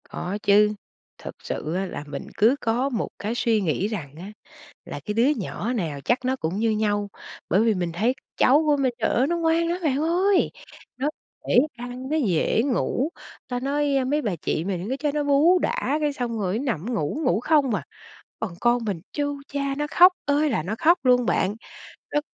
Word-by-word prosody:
Có 185 +3 -4
chứ, 210 +1 +5 0.4
thật - - -9
sự 155 - -4
á 190 +1 -1
là 160 - -6
mình 140 -1 -6
cứ 230 +6 +5
có 245 +4 0
một 240 - -2
cái 215 +3 -3
suy 225 -3 +1
nghĩ 185 +2 0
rằng 160 -11 -6
á 190 +5 -8 0.5
là - - -7
cái 210 - -3
đứa 235 +4 +3
nhỏ 220 +3 -3
nào 165 - -3
chắc 250 +1 +1
nó 260 +1 +1
cũng 175 -4 -3
như 225 +1 +2
nhau, 205 -1 0 0.4
bởi 195 +6 +3
vì 225 -2 +3
mình 175 -3 -2
thấy 225 +9 +1 0.2
cháu 285 +5 +5
của 295 -1 +4
mình, 265 -3 +1
trời 220 - 0
ơi 255 - +2
nó 345 +3 0
ngoan 335 0 +2
lắm 345 +1 -1
bạn 275 -4 +2
ơi! 360 +4 +2 0.5
Nó 270 +4 -1 0.4
dễ - - +4 0.2
ăn, 245 +2 -7
nó 310 - +1
dễ 220 - +1
ngủ, 265 +1 0 0.4
ta 245 -1 -2
nói, 285 +1 0
ơ, 265 - +2
mấy 295 +4 0
bà 205 -8 -1
chị 160 +1 -2
mình 185 0 -3
cứ 265 - -1
cho 295 +1 -1
nó 295 -1 0
bú 290 +6 +4
đã 295 -3 0
cái 295 -1 +1
xong 240 -4 -3
rồi 195 0 -1
nó 265 - -4
nằm 220 +7 -4
ngủ, 200 - -2
ngủ 180 +5 +2
không 275 -3 +2
à. - - -2 0.6
Còn 210 -6 -4
con 240 0 +2
mình 200 -6 -3
chu 285 -1 -2
cha 280 -1 -2
nó 295 - -1
khóc 360 +1 +7
ơi 290 +1 +2
là 225 - 0
nó 185 +7 -3
khóc 340 +6 +4
luôn 250 -1 +4
bạn, 195 -1 +1 0.6
nó 295 - +2
245 Hz, 215 wpm, -24 LUFS, 205-285 Hz, 0.6 s, khóc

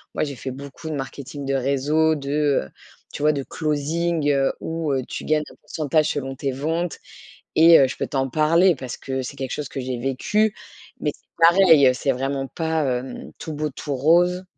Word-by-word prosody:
moi, - - 0
j'ai 145 -2 -4
fait 130 +1 -6
beaucoup 140 +4 -9
de - - -2
marketing 140 +1 -6
de 135 0 0
réseau, 140 +4 +2
de, 140 -1 -6 0.4
heu, - - -20 0.4
tu 145 - -5
vois, 150 - +5
de 140 - -2
closing 155 +2 -1
heu, 135 -1 +2
où, 160 -3 -2
heu, 130 - 0
tu - - -6
gagnes 155 0 +2
un - - -16
pourcentage 155 0 0
selon 135 -1 -3
tes 135 +1 -2
ventes, 160 +6 -2 0.6
et, 165 +1 +8
heu, 135 - +4
je - - -6
peux - - -2
t'en 135 -1 -1
parler 165 +5 +4
parce 130 -2 -7
que 130 0 -3
c'est 130 - -6
quelque 130 -2 -4
chose 145 -2 -4
que 135 - -4
j'ai 130 -1 -3
vécu, 200 - 0 0.5
mais - - -1
c'est - - -26 0.2
pareil, 165 -8 +6
c'est 135 +1 0
vraiment 135 +1 -2
pas 160 -1 -1 0.2
hem, 130 0 -9
tout 160 - -6
beau, 150 0 -2
tout 140 +1 -5
rose. 175 +6 +3
145 Hz, 200 wpm, -23 LUFS, 135-160 Hz, 0.6 s, et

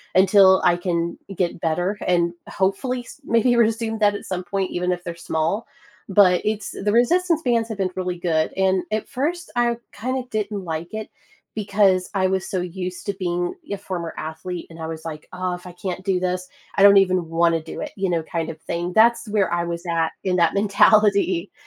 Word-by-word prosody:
until 190 0 +6
I 175 - +4
can 170 -1 -2 0.2
get 175 -1 -1
better 175 +5 -1
and 170 -1 +2 0.2
hopefully 245 +7 -1
s 245 - -13
maybe 230 +2 +3
resume 225 -1 +1
that 205 -1 +3
at - - -6
some 185 -1 -3
point, 190 +1 -2
even 180 +1 -1
if 175 0 -6
they're 170 -1 -5
small. 165 +8 0 0.4
But 185 -2 +5
it's 215 -2 -2
The 205 +1 -2
resistance 330 - +3
bands 230 -2 +1
have 220 - -5
been 190 -2 -1
really 180 -1 -2
good, 165 -2 0
and 190 -1 +2
at 215 0 -1
first, 310 +6 -3
I 240 -1 +2
kinda 255 +3 -3
didn't 210 -2 -2
like 165 0 -4
it 215 -1 -4 0.5
because 195 -3 +2
I 190 -1 +2
was 190 0 -1
so 185 - -1
used 180 0 -5
to 200 - -1
being 175 -2 -2 0.2
a 200 - -1
former 180 -4 -5
athlete, 160 +3 -5
and 165 - -12
I 160 - -4
was 160 0 -7
like, 155 -2 -7
"Oh, 185 0 -2
if 180 +1 -8
I - - -8
can't 185 0 -5
do 190 -2 +1
this, 180 0 -2 0.3
I - - +1
don't 200 0 +9
even 185 -3 +3
want 170 +1 +3
to 165 - 0
do 160 - -8
it," - - -5
you 195 -2 -1
know, 170 -2 0
kind 165 0 -3
of 160 - -7
thing. 175 +2 -3
That's 230 +2 +4
where 205 -4 +1
I 170 0 +1
was 170 0 -4
at 165 -2 +1
in 185 -1 +1
that 170 +1 +3
mentality. 200 -2 +3
185 Hz, 210 wpm, -22 LUFS, 175-210 Hz, 0.5 s, don't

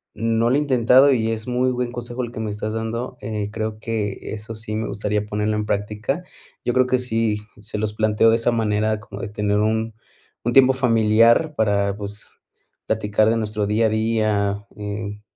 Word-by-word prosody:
No 115 +1 +1
lo 135 - +3
he - - +3
intentado 130 0 +5
y 115 -2 0
es 110 +1 -4
muy 125 +1 +1
buen 125 -1 -2
consejo 120 +1 -5
el 120 0 -6
que 110 - -5
me 110 - -3
estás 105 +1 -4
dando. 115 +3 -3
Eh, 105 -1 -3
creo 110 0 -4
que 110 -3 -3
eso 110 +1 -7
sí 110 -1 -6
me 110 +1 -2
gustaría 105 +1 -2
ponerlo 105 +1 -1
en 105 - -1
práctica. 105 - -2 0.4
Yo 120 - +1
creo 130 0 +4
que 125 0 +1
sí 110 -3 -1 0.2
se 105 - -6
los 105 0 -2
planteó 110 +1 +3
de 115 - +5
esa 115 +1 +1
manera 110 -1 0
como 100 -2 -9
de 115 - -4
tener 105 -1 0
un 110 +1 0 0.5
un 120 - 0
tiempo 130 0 +7
familiar 115 +3 +4
para 100 -2 +1
pues, 105 0 -7 0.6
platicar 110 0 +2
de 115 - +2
nuestro 105 -2 -2
día 110 +2 +2
a - - +3
día, 110 -2 0
eh, 105 0 -5
110 Hz, 195 wpm, -22 LUFS, 105-115 Hz, 0.6 s, tiempo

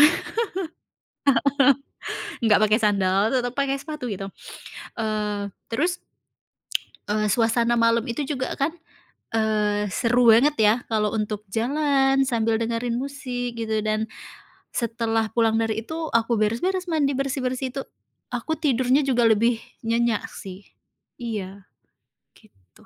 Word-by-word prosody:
heeh, 300 - +10 2.3
nggak 215 -2 +5
pakai 215 +1 +4
sandal, 200 0 +3
tetap 245 -1 0
pakai 275 0 0
sepatu 300 -5 -5
gitu. 195 0 -4 0.7
Eee, 210 -2 -2 0.2
terus 345 +9 0 1.1
Eee, 210 0 0
suasana 235 +1 +2
malam 230 0 +3
itu 275 +4 -2
juga 260 -3 -2
kan, 295 +4 0 0.6
eee, 210 -2 +1
seru 240 0 +3
banget 285 +6 +4
ya 215 0 +5 0.2
kalau 210 -1 +1
untuk 210 -1 -3
jalan 270 +3 +2
sambil 225 -2 +1
dengerin 230 +1 -1
musik 250 -3 -4
gitu, 220 -1 -1
dan 215 +1 0 0.6
setelah 225 -2 0
pulang 225 -1 +2
dari 225 0 0
itu 320 0 -4
aku 230 +1 +2
beres-beres, 345 - 0
mandi, 285 -4 +2
bersih-bersih, 260 -1 -1
itu 275 - -2 0.5
aku 320 -2 -2
tidurnya 260 -1 +2
juga 240 -3 +3
lebih 230 +1 +2 0.2
nyenyak 230 -1 +1
sih. 190 +1 -10 0.6
Iya 200 -4 -5 0.7
gitu. 95 - -24
230 Hz, 120 wpm, -24 LUFS, 215-265 Hz, 2.3 s, heeh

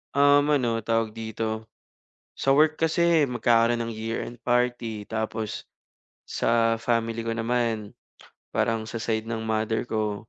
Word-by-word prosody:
Um, 145 0 +5
ano 120 -4 0
tawag 115 0 0
dito, 110 0 -4 0.7
sa 135 - +2
work 155 +2 +4
kasi 165 -1 +3
magkakaroon 120 -1 +2
ng 115 0 -4
year-end 115 +2 -4
party 120 -3 0
tapos 110 -1 -3 0.6
sa 115 -1 +1
family 115 -1 0
ko 115 - -4
naman 115 -2 -1 0.6
parang 115 -1 0
sa 115 +1 -6
side 110 -1 -1
ng 115 -1 -4
mother 110 +1 -1
ko 105 -1 -2
115 Hz, 130 wpm, -26 LUFS, 110-120 Hz, 0.7 s, Um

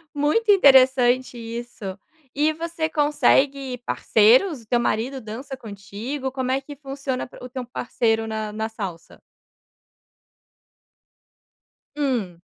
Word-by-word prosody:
Muito 305 +10 +2
interessante 255 -7 +5
isso, 230 -4 -7 0.4
e 300 +2 +2
você 330 0 -3
consegue 280 -3 +2
parceiros, 245 - +3
o 225 - -20
teu 240 +2 +2
marido 240 +3 -1
dança 250 +4 -7
contigo, 225 +6 -6
como 260 -1 -2
é 265 +1 +1
que 290 +2 -10
funciona 275 -2 -4
p - - -15
o 250 - -8
teu 255 0 -5
parceiro 225 -2 -1
na 215 -1 -4
na 220 +1 -3
salsa? 195 -6 -8 2.7
Hum. 235 -12 -2
255 Hz, 115 wpm, -23 LUFS, 225-280 Hz, 2.7 s, interessante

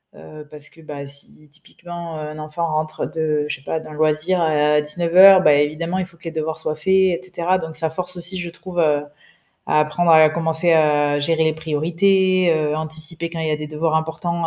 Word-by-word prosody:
heu, 150 - -13
parce 150 -1 -11
que, - - -21
bah, 145 -2 -8
si 140 +2 -11
typiquement 170 +2 -10
un 155 0 -7
enfant 155 +2 -4
rentre 155 0 -3
de 155 -2 -2
je - - -3
sais 130 - -17
pas, 160 - -3
d'un 155 - -12
loisir 155 +4 0
à 150 -2 +2
19:00, 175 +5 +5
bah, 150 -5 +5
évidemment 155 +5 -1
il 185 - -2
faut 170 -1 -16
que 170 - -27
les 165 - -5
devoirs 160 0 -4
soient 155 -1 -1
faits, 155 - -11
et 190 -3 +2
cetera, 180 0 -1
donc 160 -3 -7
ça 160 - -1
force 180 +3 -4
aussi, 175 +2 -2
je 175 -1 -5
trouve, 175 +1 -7
heu, 150 -3 +2 0.7
à 150 - +2
apprendre 150 +3 0
à 155 -1 +7
commencer 165 +1 +1
à 150 -2 +2
gérer 160 +2 +1
les 160 - +1
priorités, 175 +4 +1
heu, 150 -1 -1
anticiper 160 +1 -3
quand 165 -1 -7
il 160 - -2
y - - -1
a 150 - 0
des 150 0 -7
devoirs 155 +1 -1
importants, 165 +2 -3
160 Hz, 215 wpm, -20 LUFS, 150-170 Hz, 0.7 s, à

